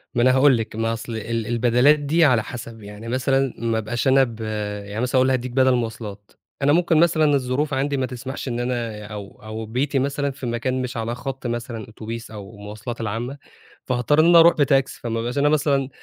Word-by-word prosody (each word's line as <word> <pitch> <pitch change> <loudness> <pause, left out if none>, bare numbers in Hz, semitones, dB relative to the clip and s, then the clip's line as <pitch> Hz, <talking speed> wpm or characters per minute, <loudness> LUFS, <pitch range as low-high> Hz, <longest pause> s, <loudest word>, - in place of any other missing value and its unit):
ما 120 - +2
أنا 130 +2 +5
هاقول 130 -1 +5
لِك 110 -1 -5
ما 115 +1 0
أصل 115 0 -6
ال 110 - -5
ال 115 -2 -2
البدلات 125 +5 +4
دي 155 +3 +3
على 125 -6 +3
حسب 115 0 -8
يعني 105 +2 -9
مثلًا 130 +1 +1
ما 115 -1 -1
أبقاش 120 +4 -2
أنا 135 0 +6
ب 115 -3 -5 0.5
يعني 105 +3 -4
مثلًا 125 +1 -1
يقول 130 0 +4
لي 130 - +2
هادِّيك 130 -1 -2
بدل 130 0 +3
مواصلات، 110 -4 -5 0.3
أنا 140 +1 +4
ممكن 170 -1 +3
مثلًا 155 -3 +4
الظروف 140 +3 -1
عندي 140 +1 0
ما 130 - 0
تسمحش 130 +3 -6
إن 120 -1 -2
أنا 120 -4 -3
أو 105 -1 -9
أو 110 +1 -6
بيتي 135 +5 -1
مثلًا 140 +1 -1
في 135 -1 -8
مكان 125 +2 -1
مش 125 -1 -4
على 115 +1 -2
خط 130 0 -5
مثلًا 120 -2 -4
أوتوبيس 115 +1 -7
أو 105 -1 -9
المواصلات 105 +4 -7
العامة، 115 +5 -3 0.5
فهاضطر 130 +4 +1
إني 160 +2 +6
أنا 170 -1 +8
أروح 170 +1 +7
بتاكسي 135 -2 +2
فما 115 -1 -2
أبقاش 120 +4 -3
أنا 145 +1 +3
مثلًا 140 -3 +1
125 Hz, 215 wpm, -22 LUFS, 115-135 Hz, 0.5 s, أنا